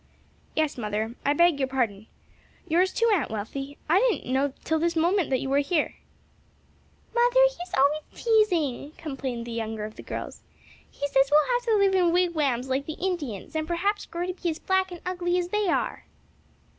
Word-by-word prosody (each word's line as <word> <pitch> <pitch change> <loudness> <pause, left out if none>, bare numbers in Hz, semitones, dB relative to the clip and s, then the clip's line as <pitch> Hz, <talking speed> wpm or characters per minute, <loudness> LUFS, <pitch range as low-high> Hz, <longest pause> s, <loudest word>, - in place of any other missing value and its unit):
"Yes, 310 -4 0
mother, 215 +1 -2
I 285 - +3
beg 340 -1 +4
your 265 - +1
pardon. 225 -6 -2 0.6
Yours 360 +3 +3
too, 465 - +1
Aunt 340 -10 +1
Wealthy, 270 +7 -5
I 340 +5 +5
didn't 440 - 0
know 275 +1 +2
till 320 0 0
this 340 +1 0
moment 345 +2 +2
that 260 -2 +1
you - - -3
were 275 +1 +3
here." 300 +2 0 1.2
"Mother, 485 +1 +4
he's 370 -8 -3
always 285 +3 +3
teasing," 345 - +1
complained 265 -6 -5
the 235 - -7
younger 220 -2 -3
of 215 - -10
the - - -7
girls, - - -6 0.5
"he 285 - -3
says 270 -1 +3
we'll 305 +11 +4
have - - 0
to 450 - +4
live 395 -2 +3
in 360 -3 +3
wigwams 310 -8 +1
like 265 +1 -1
the 315 - -3
Indians 315 - -3
and 315 0 -1
perhaps 395 +5 -1
grow 345 +1 -3
to 365 - -3
be 355 -1 -3
as 315 - -3
black 380 0 0
and 350 - -8
ugly 355 -1 0
as 355 -1 -1
they 420 +1 0
are." 335 - -1
315 Hz, 190 wpm, -26 LUFS, 270-365 Hz, 1.2 s, I